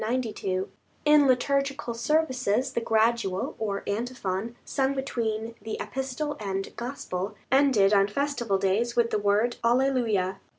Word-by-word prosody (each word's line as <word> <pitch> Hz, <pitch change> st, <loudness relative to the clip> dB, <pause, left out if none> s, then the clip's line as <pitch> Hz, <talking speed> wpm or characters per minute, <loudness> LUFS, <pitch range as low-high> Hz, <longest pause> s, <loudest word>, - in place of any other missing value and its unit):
In 295 Hz, -1 st, +6 dB
liturgical 275 Hz, 0 st, +1 dB
services 255 Hz, -2 st, +1 dB
the 235 Hz, -, 0 dB
Gradual 220 Hz, -4 st, +1 dB
or 200 Hz, -3 st, -2 dB
Antiphon, 225 Hz, -1 st, -3 dB
sung 270 Hz, 0 st, 0 dB
between 230 Hz, -4 st, -2 dB
the 220 Hz, +1 st, -4 dB
Epistle 270 Hz, +3 st, -3 dB
and 195 Hz, -2 st, -4 dB
Gospel, 210 Hz, -5 st, -4 dB, 0.2 s
ended 260 Hz, -8 st, +4 dB
on 200 Hz, -1 st, +5 dB
festival 240 Hz, -3 st, -1 dB
days 200 Hz, +5 st, 0 dB
with 235 Hz, -1 st, +2 dB
the 215 Hz, -, +1 dB
word 205 Hz, +4 st, +1 dB
Alleluia. 230 Hz, -6 st, +2 dB
235 Hz, 120 wpm, -27 LUFS, 205-265 Hz, 0.2 s, In